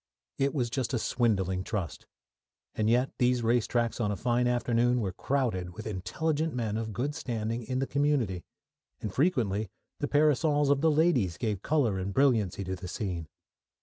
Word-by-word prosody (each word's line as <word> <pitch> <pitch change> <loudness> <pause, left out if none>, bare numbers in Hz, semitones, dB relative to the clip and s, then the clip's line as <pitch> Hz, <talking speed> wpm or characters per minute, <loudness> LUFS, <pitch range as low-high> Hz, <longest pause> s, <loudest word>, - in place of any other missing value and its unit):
It 140 +2 +1
was 120 -5 0
just 130 0 -1
a - - +2
swindling 95 -6 0
trust. 95 -6 -4 0.7
And 110 0 +1
yet, 125 +3 +2
these 125 -1 +2
race 115 0 +2
tracks 120 -1 0
on 105 -2 +1
a - - -1
fine 120 0 +1
afternoon 120 0 +2
were 95 -5 -2
crowded 95 -9 -1
with 110 - -8
intelligent 145 - -2
men 110 -4 -1
of 110 0 -3
good 130 +7 -2
standing 115 -6 -3
in 130 +2 -3
the 135 - +1
community, 135 -11 0 0.6
and 105 - -5
frequently 110 - +1 0.3
the - - -1
parasols 145 -1 +3
of 140 -1 +2
the 160 - +4
ladies 145 - +2
gave 105 -5 -2
colour 125 -11 +1
and 95 +1 -4
brilliancy 110 -9 +2
to 95 0 -3
the 90 0 -8
scene. 90 -4 -4
120 Hz, 175 wpm, -29 LUFS, 100-135 Hz, 0.7 s, the